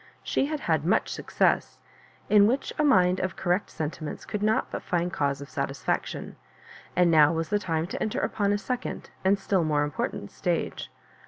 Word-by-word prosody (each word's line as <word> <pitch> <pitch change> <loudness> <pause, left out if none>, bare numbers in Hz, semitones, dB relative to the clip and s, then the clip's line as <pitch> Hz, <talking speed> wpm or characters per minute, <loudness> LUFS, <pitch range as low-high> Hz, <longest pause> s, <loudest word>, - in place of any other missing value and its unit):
She 275 - 0
had 305 -1 -3
had 160 -3 +1
much 185 +7 +2
success, - - 0 0.5
in 205 -1 +6
which 260 +5 -1
a - - +4
mind 185 -10 +4
of 185 -1 -2
correct 180 +2 0
sentiments 155 -1 -5
could 210 - -4
not 215 +1 +1
but - - -4
find 175 0 -1
cause 140 -1 0
of 140 - -9
satisfaction; 140 -1 -3 0.6
and 175 -1 +4
now 155 -2 +6
was 165 -1 -2
the 205 - +2
time 165 -4 -1
to 180 - -6
enter 215 - -1
upon 200 -1 0
a 205 - +2
second 250 +4 -4
and 195 +2 +4
still 195 -2 +1
more 150 -2 +2
im 145 - -2
portant - - -4
stage. - - -2
180 Hz, 185 wpm, -27 LUFS, 155-205 Hz, 0.6 s, in